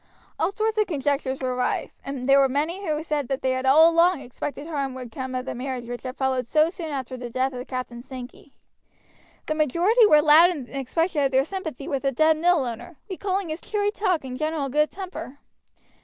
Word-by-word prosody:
All -, -, +1 dB
sorts 435 Hz, +1 st, -1 dB
of 425 Hz, -, +2 dB
conjectures 275 Hz, -4 st, -1 dB
were 255 Hz, -1 st, -1 dB
rife, 250 Hz, -, -1 dB
and 270 Hz, -2 st, -5 dB
there 275 Hz, 0 st, +6 dB
were 270 Hz, -1 st, +4 dB
many 315 Hz, +8 st, -1 dB
who 305 Hz, 0 st, -1 dB
said 300 Hz, -4 st, -2 dB
that 270 Hz, +1 st, -3 dB
they 260 Hz, -, +2 dB
had 260 Hz, +1 st, -1 dB
all 310 Hz, +5 st, +7 dB
along 335 Hz, -1 st, +3 dB
expected 280 Hz, +3 st, -6 dB
harm 280 Hz, -5 st, -3 dB
would 250 Hz, -3 st, -8 dB
come 260 Hz, +2 st, -5 dB
of 255 Hz, 0 st, -3 dB
the -, -, -4 dB
marriage 255 Hz, -1 st, -4 dB
which 240 Hz, 0 st, -6 dB
had 255 Hz, 0 st, -7 dB
followed 260 Hz, -2 st, 0 dB
so 310 Hz, +5 st, +3 dB
soon 335 Hz, -3 st, -6 dB
after 260 Hz, -3 st, -4 dB
the 245 Hz, -1 st, -6 dB
death 260 Hz, +3 st, -1 dB
of 250 Hz, 0 st, -6 dB
Captain 255 Hz, -2 st, -5 dB
Sankey. 255 Hz, +2 st, -10 dB, 0.9 s
The -, -, -1 dB
majority 345 Hz, -, +4 dB
were 300 Hz, -5 st, +6 dB
loud 315 Hz, +3 st, +7 dB
in 290 Hz, -9 st, -5 dB
expression 295 Hz, +4 st, -1 dB
of 275 Hz, -, +3 dB
their 265 Hz, +1 st, +2 dB
sympathy 315 Hz, -7 st, -6 dB
with 275 Hz, -2 st, -1 dB
the 275 Hz, -, +1 dB
dead 310 Hz, +4 st, +3 dB
mill 340 Hz, -2 st, +3 dB
owner, 240 Hz, +7 st, -7 dB
recalling 380 Hz, -1 st, -2 dB
his 310 Hz, +2 st, -4 dB
cheery 415 Hz, -1 st, -1 dB
talk 375 Hz, -7 st, 0 dB
and 255 Hz, -1 st, -6 dB
general 310 Hz, -1 st, -2 dB
good 300 Hz, +3 st, +2 dB
temper. 345 Hz, -7 st, -8 dB
280 Hz, 215 wpm, -24 LUFS, 260-330 Hz, 0.9 s, all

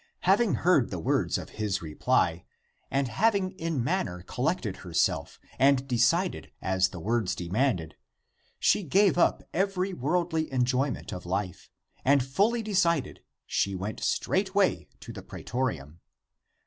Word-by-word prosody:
Having 200 Hz, +3 st, +3 dB
heard 165 Hz, -8 st, +3 dB
the 90 Hz, -, -4 dB
words 80 Hz, -, 0 dB
of -, -, -7 dB
his 100 Hz, -2 st, 0 dB
reply, 80 Hz, +2 st, 0 dB, 0.5 s
and 135 Hz, -1 st, 0 dB
having 200 Hz, -, +1 dB
in 165 Hz, -8 st, -2 dB
manner 110 Hz, -, -2 dB
collected 125 Hz, -, -2 dB
herself 85 Hz, -3 st, -1 dB, 0.2 s
and 135 Hz, 0 st, +4 dB
decided 145 Hz, +9 st, +1 dB
as 95 Hz, 0 st, +1 dB
the 90 Hz, -, -8 dB
words 110 Hz, +1 st, 0 dB
demanded, 90 Hz, -, -1 dB, 0.6 s
she -, -, +3 dB
gave 195 Hz, +4 st, +3 dB
up 175 Hz, -, +2 dB
every 190 Hz, +1 st, 0 dB
worldly 160 Hz, +1 st, -1 dB
enjoyment 130 Hz, +2 st, 0 dB
of 90 Hz, -1 st, -7 dB
life, 95 Hz, 0 st, -3 dB, 0.3 s
and 135 Hz, -1 st, +4 dB
fully 210 Hz, -, +1 dB
decided 175 Hz, -8 st, 0 dB, 0.2 s
she 100 Hz, -1 st, 0 dB
went 100 Hz, +4 st, -4 dB
straightway 195 Hz, 0 st, +1 dB
to -, -, -9 dB
the -, -, -8 dB
pretorium. 85 Hz, -, -4 dB
135 Hz, 130 wpm, -28 LUFS, -, 0.6 s, and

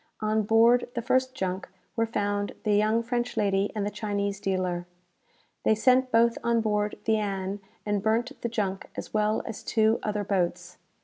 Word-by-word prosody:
On 215 Hz, 0 st, +1 dB
board 230 Hz, +3 st, +4 dB
the 235 Hz, -, -1 dB
first 260 Hz, +2 st, +1 dB
junk 190 Hz, -4 st, -3 dB, 0.3 s
were 230 Hz, -1 st, +1 dB
found 205 Hz, -2 st, -1 dB
the 210 Hz, -, +2 dB
young 215 Hz, +3 st, +3 dB
French 240 Hz, +1 st, -2 dB
lady 200 Hz, -1 st, +1 dB
and 205 Hz, -2 st, -1 dB
the 205 Hz, -, -2 dB
Chinese 200 Hz, -1 st, -2 dB
dealer. 185 Hz, -3 st, -1 dB, 0.8 s
"They 220 Hz, -, +4 dB
sent 255 Hz, +3 st, +3 dB
both 230 Hz, 0 st, +4 dB
on 235 Hz, 0 st, +2 dB
board 210 Hz, -1 st, 0 dB
the 220 Hz, -1 st, +3 dB
'Ann,' 195 Hz, -1 st, -2 dB, 0.3 s
and 205 Hz, -1 st, 0 dB
burnt 225 Hz, +5 st, +1 dB
the 235 Hz, -, -1 dB
junk 200 Hz, -4 st, -2 dB
as -, -, -7 dB
well 215 Hz, 0 st, +1 dB
as 225 Hz, -, -6 dB
two 220 Hz, 0 st, +2 dB
other 210 Hz, -1 st, -1 dB
boats. 180 Hz, -3 st, -2 dB
215 Hz, 175 wpm, -27 LUFS, 200-230 Hz, 0.8 s, board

